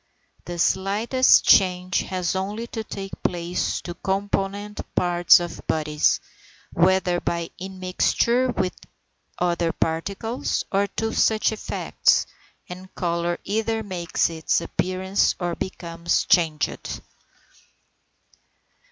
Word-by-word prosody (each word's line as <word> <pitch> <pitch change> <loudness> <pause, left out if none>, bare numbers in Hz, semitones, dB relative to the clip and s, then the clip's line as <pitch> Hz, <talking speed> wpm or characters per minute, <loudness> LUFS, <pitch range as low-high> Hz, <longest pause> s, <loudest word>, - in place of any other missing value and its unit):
The 175 0 -6
slightest 205 +9 +3
change 185 -1 +4
has 185 -1 -2
only 205 +5 -3
to 225 -1 -5
take 195 -2 -7
place 175 0 -1
in 175 - -4
the - - -5
component 200 +2 -2
parts 175 -1 +5
of 175 -1 -6
bodies, 150 -1 +1 0.5
whether 180 0 +3
by 170 -1 -2
immixture 190 +7 0
with 185 - 0 0.6
other 170 -1 +1
particles 200 +11 -2
or 200 +1 +2
other 225 0 -1
such 220 0 +2
effects, 215 - +1 0.4
and 185 +1 -10
colour 170 0 -1
either 220 +2 -1
makes 180 -4 -1
its 160 -1 0
appearance 185 +3 0
or 175 -1 -1
becomes 170 -2 -2
changed. 155 -4 +1
185 Hz, 105 wpm, -24 LUFS, 170-200 Hz, 0.6 s, parts